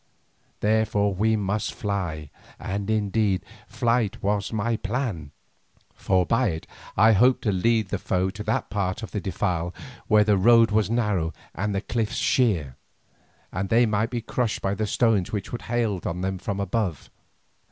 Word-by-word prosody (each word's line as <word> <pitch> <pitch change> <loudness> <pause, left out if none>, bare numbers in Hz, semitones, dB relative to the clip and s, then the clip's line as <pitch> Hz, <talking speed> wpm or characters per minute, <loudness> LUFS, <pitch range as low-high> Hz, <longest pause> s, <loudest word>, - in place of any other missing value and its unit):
Therefore 105 -1 +2
we 110 +4 +2
must 105 0 -2
fly, 85 -8 -3 0.3
and 100 +1 -4
indeed, 105 -2 +1 0.2
flight 115 -2 0
was 100 -1 0
my 115 +1 0
plan, 105 - -3 0.6
for 95 -2 +1
by 125 +7 +2
it 80 -4 -3 0.3
I 110 +3 +6
hoped 125 +5 +4
to 105 - +2
lead 110 +2 +1
the 100 - -2
foe 95 0 0
to 105 - -8
that 110 - -1
part 100 +1 -2
of - - -7
the 105 - -3
defile 90 -2 -2 0.3
where 105 -1 +5
the 105 -1 +3
road 115 +3 +5
was 105 0 +2
narrow 105 -9 0 0.2
and 100 +1 -2
the 95 - 0
cliffs 110 -1 -2
sheer, 90 - +1 0.7
and 95 +1 -3
they 120 +2 +5
might 105 +1 0
be 120 -2 -3
crushed 115 0 -1
by 95 - +1
the 105 +1 -2
stones 110 -4 +2
which 100 -3 -4
should 120 - -4
hail 115 -6 0
on 90 +1 -3
them 95 0 -2
from 100 +2 -3
above. 100 -5 -2
105 Hz, 165 wpm, -25 LUFS, 95-110 Hz, 0.7 s, I